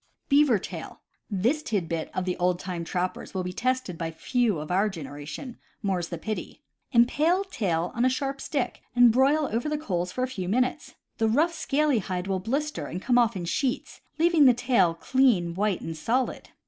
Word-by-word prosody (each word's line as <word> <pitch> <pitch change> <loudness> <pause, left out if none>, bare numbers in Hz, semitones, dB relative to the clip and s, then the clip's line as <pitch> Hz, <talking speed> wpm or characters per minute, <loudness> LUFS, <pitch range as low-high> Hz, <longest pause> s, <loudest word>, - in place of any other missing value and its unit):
Beaver 280 -5 +5
Tail. - - -8 0.2
— - - -53 0.2
This 300 +5 +3
tid 205 - -1
bit 165 -1 -3
of 185 - -1
the 180 - -1
old 180 0 +1
time 180 -2 -5
trappers 180 +3 -3
will 185 - -1
be 180 0 -4
tested 255 -5 -1
by 165 -1 -2
few 220 +5 0
of 150 +2 -6
our 195 +4 +3
generation, 150 - -8 0.2
more's 185 -4 0
the 170 - -4
pity! 215 +6 -5 0.3
Impale 300 +10 +3
tail 180 - -1
on 235 - 0
a 255 - +5
sharp 275 +1 -2
stick 275 -5 -2
and 245 -1 +7
broil 275 +5 +3
over 235 +6 -1
the 300 - -1
coals 180 - -2
for 255 - -2
a - - +1
few 190 -8 -5
minutes. 250 +4 0 0.2
The 225 -1 +3
rough, 315 +9 +2
scaly 295 -5 +1
hide 180 -2 -3
will 195 -1 -1
blister 280 +10 -2
and 180 - -5
come 245 +4 +3
off 235 -4 +2
in 180 -2 -4
sheets, 255 - -2 0.2
leaving 330 -2 +5
the 250 -2 +7
tail 235 -9 +2
clean, 215 -5 +2
white, 200 0 0
and 165 - -5
solid. 240 +10 -1
225 Hz, 200 wpm, -26 LUFS, 180-265 Hz, 0.3 s, and